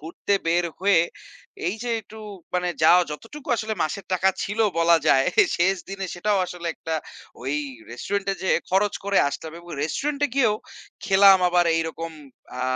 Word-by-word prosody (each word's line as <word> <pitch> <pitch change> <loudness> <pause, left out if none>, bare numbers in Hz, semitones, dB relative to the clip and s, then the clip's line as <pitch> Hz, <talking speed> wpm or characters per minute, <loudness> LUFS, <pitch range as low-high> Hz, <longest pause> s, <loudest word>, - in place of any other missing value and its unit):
ঘুরতে 165 +5 -2
বের 170 +1 +2
হয়ে 195 -2 +4 0.7
এই 180 - 0
যে 245 - -3
একটু 220 +1 -14 0.4
মানে 180 0 0
যা 160 - +7 0.2
যতটুকু 225 - -9
আসলে 220 0 -3
মাসের 180 +5 -3
টাকা 185 +1 +3
ছিল 210 +3 -4 0.2
বলা 170 0 +5
যায় 135 0 +4 0.3
শেষ 190 +3 +2
দিনে 195 -1 -4
সেটাও 200 +3 0
আসলে 175 -1 -7
একটা 160 - -4 0.5
ওই 135 +3 -2 0.4
রেস্টুরেন্টে 195 +10 -2
যেয়ে 190 - +2
খরচ 195 +2 +2
করে 200 0 +2
আসতে - - -6
হবে 165 +2 -8
এবং 175 0 -14
রেস্টুরেন্ট 280 - -2
এ - - -15
গিয়েও 235 -6 +3 0.5
খেলাম 195 0 +7
আবার 175 0 +3
এইরকম 165 0 -3 0.5
আ - - -1
190 Hz, 165 wpm, -24 LUFS, 165-200 Hz, 0.7 s, যা